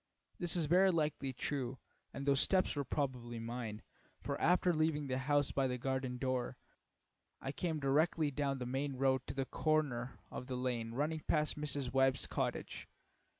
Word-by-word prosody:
This 175 -1 +1
is 170 -3 +2
very 185 +5 +5
likely 150 -5 0
true, 130 0 -3 0.3
and 140 - -5
those 140 -1 +4
steps 185 0 +3
were 145 - 0
probably 125 -4 -2
mine, 115 -2 -5 0.4
for - - -3
after 180 +1 +4
leaving 155 -2 +1
the 130 -1 -1
house 145 +1 +2
by 135 -1 +1
the 125 -1 -2
garden 130 0 -2
door, 130 -1 -1 0.8
I 135 - -4
came 160 +1 -2
directly 150 +2 +2
down 140 -1 -1
the 125 - -4
main 135 +2 -2
road 130 0 +2
to - - -5
the 135 -1 0
corner 135 -5 0
of 125 - -6
the 130 -2 -3
lane 120 -2 -2
running 155 +4 0
past 150 -1 +2
Mrs. 140 -4 -2
Webb's 135 -1 +3
cottage. - - -3
135 Hz, 170 wpm, -36 LUFS, 125-150 Hz, 0.8 s, very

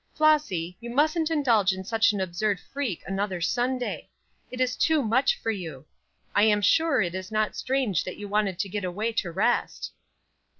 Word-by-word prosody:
Flossy, 295 - +2
you 235 0 -8
mustn't 310 +5 +2
indulge 235 -11 +3
in 190 0 -6
such 225 +2 +3
an 205 - -3
absurd 190 +2 -1
freak 265 - -4
another 195 0 -2
Sunday. 245 +7 -1 0.4
It 250 - -8
is 255 -1 +1
too 315 -3 +2
much 255 - +2
for 225 - -1
you. 160 -9 -7 0.5
I - - +3
am 210 -1 +3
sure 320 - +3
it 175 -1 -3
is 185 +2 -6
not 215 0 0
strange 255 - 0
that 185 - -6
you 205 - -7
wanted 200 -3 0
to 200 - -1
get 200 +1 -4
away 205 +6 -2
to 195 -6 -2
rest." 215 +8 0
215 Hz, 180 wpm, -26 LUFS, 190-255 Hz, 0.5 s, indulge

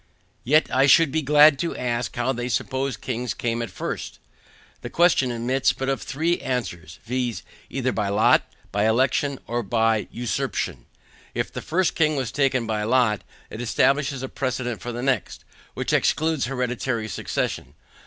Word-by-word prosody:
Yet 150 +5 +4
I 135 +2 +4
should 150 +1 +6
be 160 - +1
glad 150 0 +6
to 170 - -2
ask 120 -2 -2
how 120 +2 0
they 120 0 -3
suppose 130 +2 -1
kings 125 -1 -3
came 115 0 -2
at 115 - -4
first? 90 - -5 0.6
The - - -6
question 170 -7 +3
admits 125 +3 +1
but 135 0 -3
of 135 - -1
three 165 +5 -1
answers, 85 -11 -4
viz. 125 -1 -2 0.3
either 130 -1 -1
by 105 -4 -1
lot, 105 +2 +4 0.3
by 105 +2 +1
election, 130 +4 +2
or 120 +1 -2
by 110 0 +1
usurpation. 110 - -3 0.5
If - - -2
the - - -4
first 185 +2 +1
king 155 -2 +2
was 130 -4 -2
taken 135 -4 +1
by 110 -1 -1
lot, 110 -2 +2 0.3
it 110 - -6
establishes 135 +3 +1
a - - -2
precedent 125 -4 -3
for 120 - -4
the 120 +1 -5
next, 135 -1 -1 0.3
which - - -2
excludes 160 -4 +2
hereditary 125 -2 -2
succession. 100 - -3
125 Hz, 165 wpm, -24 LUFS, 115-135 Hz, 0.6 s, should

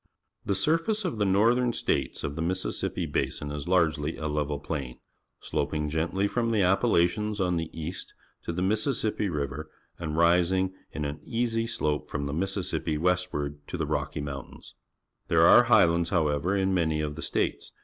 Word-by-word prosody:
^^ - - -59 0.4
The 100 - 0
surface 165 - +1
of 155 -12 -2
the 105 - +3
Northern 120 +5 +3
States - - -1
of 70 - -3
the 80 - -3
Mississippi 95 +3 -2
Basin 75 0 -2
is 75 +1 -5
largely 80 -4 +1
a 75 -1 -3
level 75 -1 -1
plain, 70 -5 -5 0.4
sloping 75 -1 -2
gentlj^ 85 +6 0
from 115 +2 0
the 110 -3 +2
Appalachians 100 +1 +2
on 90 -2 +1
the 80 -1 -3
east 85 +3 -6 0.3
to - - -2
the 90 +2 -2
Mississippi 110 0 0
River 75 0 -3 0.3
and 80 -2 -3
rising 90 +2 +3 0.2
in 75 - -4
an 70 +1 -4
easy 115 -1 -1
slope 75 -9 -2
from 70 - -3
the 70 - -3
Mississippi 85 -3 -1
westward 85 -4 -1
to - - -4
the - - -1
Rocky 75 - -2
IVIountains. 70 -2 -8 0.5
There - - +5
are - - +8
highlands, 85 0 +4
however, 80 +2 +1
in 95 0 +1
many 80 -4 +1
of 75 -1 -3
the 80 - -7
states. - - -2
85 Hz, 170 wpm, -27 LUFS, 75-100 Hz, 0.5 s, are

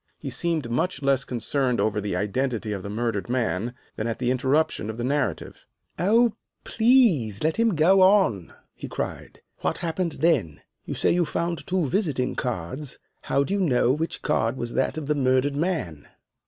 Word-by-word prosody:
He 135 - -6
seemed 155 -2 -1
much 140 +4 -1
less 135 -1 +2
concerned 125 +1 -1
over 105 -1 +1
the 100 -3 -2
identity 110 +3 -1
of 100 -2 -3
the 100 - -7
murdered 115 0 -2
man 120 -1 -1 0.2
than 110 - -2
at 115 - -2
the 125 0 0
interruption 130 -2 +1
of 110 - -5
the 120 - -3
narrative. 130 - -2 0.3
"Oh, 225 +5 +4 0.3
please 220 - +3
let 160 +1 +1
him 230 -4 +2
go 185 +5 +5
on!" 185 - +4 0.2
he - - -8
cried. - - -6 0.2
"What - - -1
happened 170 0 -2
then? 135 - +1 0.2
You - - -4
say - - +2
you 175 0 +3
found 170 +1 -3
two 180 -2 +1
visiting 145 -6 0
cards. 125 - -4 0.3
How 140 - +3
do 185 - -3
you 200 - +1
know 130 -8 +3
which 160 +3 -3
card 130 -4 0
was 120 -1 -4
that 130 +2 0
of 155 - -4
the 150 - +1
murdered 130 0 +1
man?" 150 - -2
135 Hz, 180 wpm, -25 LUFS, 115-170 Hz, 0.3 s, go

